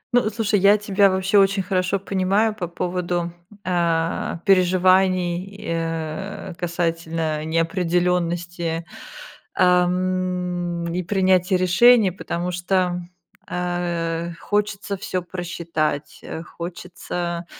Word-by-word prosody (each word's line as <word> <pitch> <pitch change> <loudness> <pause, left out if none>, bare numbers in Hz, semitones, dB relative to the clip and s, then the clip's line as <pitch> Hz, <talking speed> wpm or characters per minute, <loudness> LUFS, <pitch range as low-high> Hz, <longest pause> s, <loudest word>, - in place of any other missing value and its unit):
Ну, 240 -3 +3
слушай, 215 -2 +1
я 200 +2 +6
тебя 200 -1 +3
вообще 190 +2 +2
очень 195 0 +3
хорошо 185 +1 0
понимаю 195 +3 +1
по 185 -5 -4
поводу, 175 0 -2 0.3
а, 170 -2 0
переживаний 185 -1 +3
и, 200 +2 -11
э, 165 +3 -4
касательно 165 -3 -2
неопределенности, 170 0 0 0.7
ам, 180 -1 +1
и 180 - -1
принятия 185 0 +2
решений, 190 +3 +5
потому 175 0 -4
что, 180 0 0 0.5
а, 175 -1 -2
хочется 205 -1 -1
всё 185 -1 -3
просчитать, 165 -4 -3
э, 160 - -6
хочется, 175 0 -5
180 Hz, 95 wpm, -22 LUFS, 170-190 Hz, 0.7 s, я